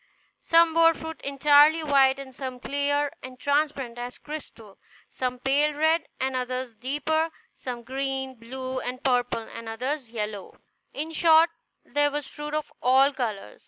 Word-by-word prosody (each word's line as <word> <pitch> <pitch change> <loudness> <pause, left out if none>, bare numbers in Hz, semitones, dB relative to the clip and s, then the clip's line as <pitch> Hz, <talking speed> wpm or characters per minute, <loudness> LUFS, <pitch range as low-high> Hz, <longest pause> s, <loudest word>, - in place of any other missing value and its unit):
Some 330 0 +4
bore 330 0 +5
fruit 320 0 -8
entirely 290 +3 +5
white, 275 -2 +4
and 270 -1 -9
some 260 -1 -6
clear 285 +2 0
and 255 0 -10
transparent 285 -4 0
as 245 +1 -6
crystal; 235 -9 -10 0.3
some 250 -1 -3
pale 285 +4 +2
red, 315 +2 +2
and 265 0 -1
others 255 -1 -3
deeper; 295 +7 -1 0.2
some 245 -2 -6
green, 265 +1 -3
blue, 255 +2 -5
and 255 +2 -5
purple, 245 -3 +1
and 230 -1 -8
others 255 +3 -3
yellow; 210 -3 -5 0.3
in 310 +3 -4
short, 325 0 +5 0.3
there 290 0 +2
was 290 0 -4
fruit 295 0 -6
of 305 -1 -3
all 265 +3 +5
colors. 220 - -4
270 Hz, 150 wpm, -26 LUFS, 250-295 Hz, 0.3 s, bore